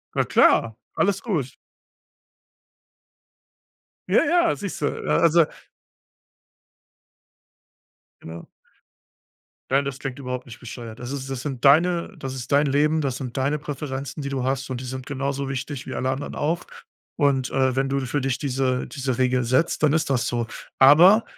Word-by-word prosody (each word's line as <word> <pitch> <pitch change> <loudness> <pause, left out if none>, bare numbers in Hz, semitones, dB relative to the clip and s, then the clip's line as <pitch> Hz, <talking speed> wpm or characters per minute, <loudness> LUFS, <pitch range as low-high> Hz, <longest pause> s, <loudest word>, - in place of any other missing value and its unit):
Na - - +3
klar, 115 -1 +4 0.2
alles 200 -2 +1
gut. 160 - -2 2.5
Ja, - - +4
ja, 345 0 +3
siehst 200 -7 -6
du. 145 - +2 0.2
A - - +3
also 170 0 +5 2.8
Genau. 80 +1 -9 1.2
Nein, 140 +1 +3
das 140 -1 -5
klingt 135 0 -5
überhaupt 125 -1 -5
nicht 115 - -11
bescheuert. 120 -2 -9
Das 125 +1 -6
ist 135 -1 -5
das 135 -2 -4
sind 135 -5 -5
deine 170 +7 +4
das 135 -3 -5
ist 125 +1 -7
dein 145 +1 +4
Leben, 150 +3 +2
das 135 -4 -1
sind 125 -2 -6
deine 140 +3 +1
Präferenzen, 140 0 -5
die 140 - -4
du 135 -2 -2
hast 135 +1 -2
und 125 -1 -4
die 130 - -7
sind 130 0 -6
genauso 140 0 -3
wichtig 135 0 -5
wie 130 - -5
alle 130 - -1
anderen 135 +2 -4
auch. 165 +4 -1 0.5
Und, 140 -4 +1
äh, 130 -1 +2
wenn 135 +1 +1
du 135 0 -1
für 130 +3 -2
dich 135 -1 -1
diese 130 -2 -1
diese 130 -4 -3
Regel 125 -1 +1
setzt, 130 +8 +1
dann 150 -1 +4
ist 160 -2 +1
das 125 -3 +1
so. 120 -1 -1 0.3
Aber 175 - +7
135 Hz, 160 wpm, -23 LUFS, 130-145 Hz, 2.8 s, Aber